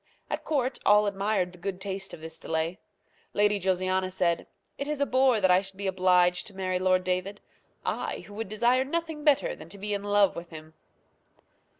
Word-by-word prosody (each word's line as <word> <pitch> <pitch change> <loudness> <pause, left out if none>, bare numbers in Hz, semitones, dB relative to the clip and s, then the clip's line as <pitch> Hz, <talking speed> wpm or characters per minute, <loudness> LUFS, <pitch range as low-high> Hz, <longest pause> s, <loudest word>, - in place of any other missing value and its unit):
At - - -2
court 265 -4 -1
all 210 0 +5
admired 200 -2 0
the 180 - -16
good 190 +1 -4
taste 195 0 -4
of 155 - -10
this 160 0 -8
delay. 160 +3 -2 0.6
Lady 205 0 +3
Josiana 185 0 0
said, 175 -2 0 0.3
"It 280 - -3
is 300 -1 -2
a 280 - +3
bore 260 -3 +3
that 190 -2 +4
I 180 +1 +5
should 195 -1 -8
be 200 - -5
obliged 180 -1 +3
to 200 - -12
marry 185 -1 -1
Lord 185 0 +3
David; 185 +3 -2 0.5
I, - - -2
who 190 +3 -13
would 215 -1 -5
desire 240 +4 +3
nothing 320 +1 -3
better 310 - +3
than - - -12
to 200 - -9
be 205 +1 -3
in 200 0 -2
love 205 -1 +3
with 170 0 -7
him!" 155 -1 -11
195 Hz, 200 wpm, -28 LUFS, 185-215 Hz, 0.6 s, all